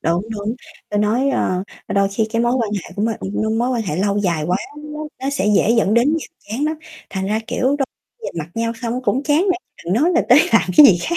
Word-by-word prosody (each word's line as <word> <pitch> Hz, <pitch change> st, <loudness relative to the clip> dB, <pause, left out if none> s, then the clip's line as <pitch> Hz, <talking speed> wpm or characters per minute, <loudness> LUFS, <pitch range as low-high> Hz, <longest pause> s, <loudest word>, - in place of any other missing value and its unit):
Đúng, 170 Hz, +3 st, 0 dB
đúng, 210 Hz, +1 st, -3 dB, 0.3 s
ta 210 Hz, -, -2 dB
nói, 230 Hz, +7 st, +2 dB
ơ, 185 Hz, -8 st, 0 dB, 0.3 s
đôi 200 Hz, 0 st, +2 dB
khi 215 Hz, +3 st, -1 dB
cái 230 Hz, 0 st, +1 dB
mối 240 Hz, -, +2 dB
quan 235 Hz, -5 st, 0 dB
hệ 195 Hz, -, -5 dB
của 205 Hz, -, -1 dB
m 225 Hz, -, +2 dB
ưm, 220 Hz, +3 st, -1 dB
mối 245 Hz, +2 st, +1 dB
quan 240 Hz, -3 st, 0 dB
hệ 180 Hz, -7 st, -3 dB
lâu 200 Hz, +2 st, +1 dB
dài 170 Hz, -6 st, 0 dB
quá 180 Hz, +2 st, +2 dB, 0.2 s
nó -, -, -10 dB, 0.4 s
nó 270 Hz, -, -1 dB
sẽ 280 Hz, -8 st, -1 dB
dễ 225 Hz, -, +3 dB
dẫn 220 Hz, -3 st, +3 dB
đến 235 Hz, +4 st, +4 dB
nhàm 325 Hz, -1 st, -2 dB, 0.2 s
chán 250 Hz, +7 st, -1 dB
lắm, 310 Hz, +1 st, -1 dB, 0.3 s
thành 190 Hz, -1 st, -3 dB
ra, 215 Hz, +2 st, 0 dB
kiểu, -, -, -2 dB
đôi 275 Hz, -, +1 dB, 0.4 s
nhìn -, -, -5 dB
mặt 155 Hz, 0 st, -5 dB
nhau 230 Hz, 0 st, -1 dB
xong 240 Hz, +2 st, -2 dB
cũng 260 Hz, +1 st, +1 dB
chán 295 Hz, +1 st, +2 dB
nữa, 370 Hz, -3 st, +2 dB, 0.2 s
chứ -, -, -15 dB
đừng -, -, +3 dB
nói 340 Hz, -, +4 dB
là 330 Hz, -, +4 dB
tới 250 Hz, -, +8 dB
làm 225 Hz, -, +6 dB
cái 295 Hz, -, +11 dB
gì 185 Hz, -9 st, +5 dB
khác 345 Hz, -, -1 dB
225 Hz, 265 wpm, -19 LUFS, 200-260 Hz, 0.4 s, cái